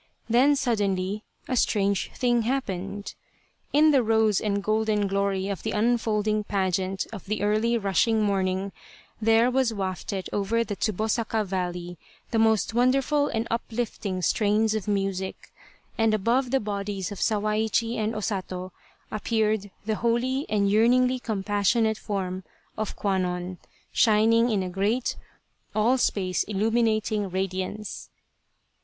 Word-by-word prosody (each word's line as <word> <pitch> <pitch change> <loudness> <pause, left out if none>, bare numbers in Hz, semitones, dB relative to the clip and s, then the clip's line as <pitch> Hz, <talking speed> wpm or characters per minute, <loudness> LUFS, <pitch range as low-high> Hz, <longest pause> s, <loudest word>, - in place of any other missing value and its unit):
Then 255 +5 +4
suddenly 205 -6 -1 0.2
a 255 - -1
strange 200 -4 +1
thing 240 -2 +2
happened. 205 -5 -3 0.6
In 305 +2 +5
the 275 -3 +4
rose 220 -2 +2
and 200 -1 -1
golden 215 -1 +1
glory 195 -1 0
of 200 -4 -3
the 220 - -3
unfolding 215 -1 +1
pageant 190 -1 -1
of 200 -3 -8
the 210 0 -2
early 215 +3 +2
rushing 215 +2 +2
morning, 195 -1 0 0.5
there 225 +3 +4
was 250 -3 +1
wafted 190 0 -3
over 215 +3 +1
the 210 -3 -4
Tsubosaka 220 +2 -1
valley 180 -2 -4 0.3
the 225 - +1
most 220 -1 +2
wonderful 270 +4 +2
and 225 -2 -2
uplifting 225 -5 -3
strains 215 +4 +2
of 215 -3 -3
music, 195 -2 -2 0.5
and 225 -1 +3
above 240 +5 +1
the 270 +1 +2
bodies 200 -3 -3
of 205 - -7
Sawaichi 220 +2 +1
and 220 +1 -1
O 215 - -3
Sato 185 -3 -4 0.4
appeared 215 -1 0 0.2
the 215 -1 -1
holy 250 +4 0
and 205 -1 +2
yearningly 250 +5 +3
compassionate 215 +1 +1
form 190 -3 -3 0.3
of 215 -1 -4
Kwannon 180 -2 -2 0.3
shining 225 +2 +4
in 205 -4 +1
a - - -3
great, 210 +7 0 0.6
all 235 +5 +3
space 185 -6 0
illuminating 215 0 0
radiance. 190 +3 -4
215 Hz, 130 wpm, -26 LUFS, 195-230 Hz, 0.6 s, In